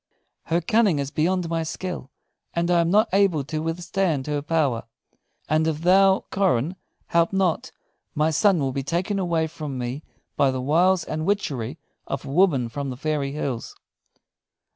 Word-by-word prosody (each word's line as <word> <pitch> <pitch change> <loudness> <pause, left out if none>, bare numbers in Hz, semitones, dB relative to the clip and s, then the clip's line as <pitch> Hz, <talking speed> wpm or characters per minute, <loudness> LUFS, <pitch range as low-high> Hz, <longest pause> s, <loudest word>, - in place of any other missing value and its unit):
Her 170 +2 +1
cunning 210 -1 +3
is 140 0 -3
beyond 175 +3 0
my 165 0 -1
skill, 165 -3 -5 0.5
and 170 +1 +1
I 170 -1 +4
am 165 - +1
not 210 +5 +4
able 190 -7 +3
to 155 +3 -4
withstand 165 -2 -1
her 150 -1 -1
power; 145 -7 0 0.6
and 155 +1 +2
if 155 -1 -1
thou, 190 +2 +4
Coran, 180 -4 +1 0.3
help 170 0 +3
not, 190 -4 0 0.4
my 155 +2 +2
son 195 +4 +3
will 135 -4 0
be 135 - -2
taken 175 +8 -1
away 170 -3 +1
from 150 -4 -6
me 125 +3 -4 0.3
by 140 - +3
the 130 0 -2
wiles 170 +7 +3
and 155 0 -4
witchery 150 - -1 0.3
of 135 - -4
a - - -6
woman 145 -7 +3
from 140 +4 -4
the 125 - -6
fairy 145 -1 -2
hills." 135 -5 -4
160 Hz, 165 wpm, -24 LUFS, 140-180 Hz, 0.6 s, I